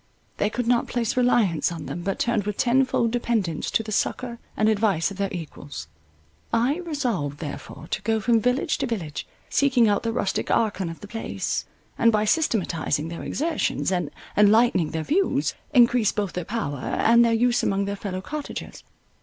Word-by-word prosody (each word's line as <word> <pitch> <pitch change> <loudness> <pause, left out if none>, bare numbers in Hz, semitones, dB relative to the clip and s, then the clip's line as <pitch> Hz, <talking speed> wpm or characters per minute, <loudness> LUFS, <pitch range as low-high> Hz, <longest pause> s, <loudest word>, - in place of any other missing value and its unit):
They 205 - +1
could 245 +2 -2
not 240 0 +2
place 235 -3 -1
reliance 225 - +2
on 165 -3 -6
them, 175 - -5
but 195 +2 -2
turned 230 -4 0
with 210 -1 -3
tenfold 245 -2 +2
dependence 225 -9 -1
to 225 - +1
the 215 - -7
succour 235 +3 -1 0.2
and 215 - +3
advice 205 -6 +2
of 195 - -8
their 200 -1 -1
equals. 145 - -7 0.6
I 240 +6 +2
resolved 250 - -2
therefore 155 0 -7
to - - -1
go 220 +2 +1
from 230 +1 +3
village 250 +4 +1
to - - 0
village, 170 -11 -4 0.2
seeking 255 -5 +3
out 205 -1 +2
the 230 - -1
rustic 200 -4 -1
archon 200 -6 +1
of 165 - -9
the 205 - -8
place, 225 +2 -3 0.3
and 230 - +5
by 215 -1 +2
systematizing 175 - 0
their 170 - -6
exertions, 315 - -1
and 180 -1 0 0.3
enlightening 210 -5 +4
their 160 0 -3
views, 375 - +1 0.2
encrease 245 -4 +5
both 205 -4 -2
their 180 -2 -3
power 180 - -3
and 235 - +3
their 235 - +3
use 240 +1 +3
among 200 0 0
their 200 0 -2
fellow 190 -2 -4
cottagers. 295 +7 -6
215 Hz, 180 wpm, -24 LUFS, 185-240 Hz, 0.6 s, and